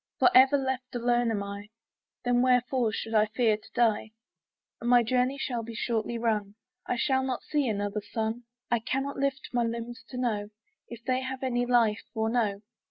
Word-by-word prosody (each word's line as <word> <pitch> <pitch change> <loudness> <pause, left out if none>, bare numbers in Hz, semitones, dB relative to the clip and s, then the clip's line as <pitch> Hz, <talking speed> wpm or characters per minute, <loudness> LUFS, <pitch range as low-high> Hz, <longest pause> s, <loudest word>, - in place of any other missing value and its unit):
For - - +5
ever 265 +2 +7
left 260 -2 -3
alone 240 0 +2
am 205 -3 -1
I, 200 +1 -7 0.6
Then 245 0 +3
wherefore 250 -2 +2
should 225 +1 -4
I 215 -1 +4
fear 220 0 +2
to 210 - -15
die? 225 -2 +2 0.7
My 240 0 +5
journey 255 +4 +1
will 240 -3 -2
be 230 0 -8
shortly 230 0 -1
run, 210 -3 -1 0.3
I - - 0
shall 265 +2 +1
not 260 -2 -3
see 295 -3 0
another 205 0 -2
sun, 220 +3 -3 0.3
I 240 - +3
cannot 270 +5 -2
lift 275 -1 -1
my 240 -1 +2
limbs 235 +1 -4
to 250 - -7
know 215 -5 -1 0.4
If 235 0 -10
they 255 0 +1
have 260 0 -5
any 245 -1 0
life 230 -3 +3
or 220 0 0
no. 210 -4 0
240 Hz, 180 wpm, -28 LUFS, 220-255 Hz, 0.7 s, ever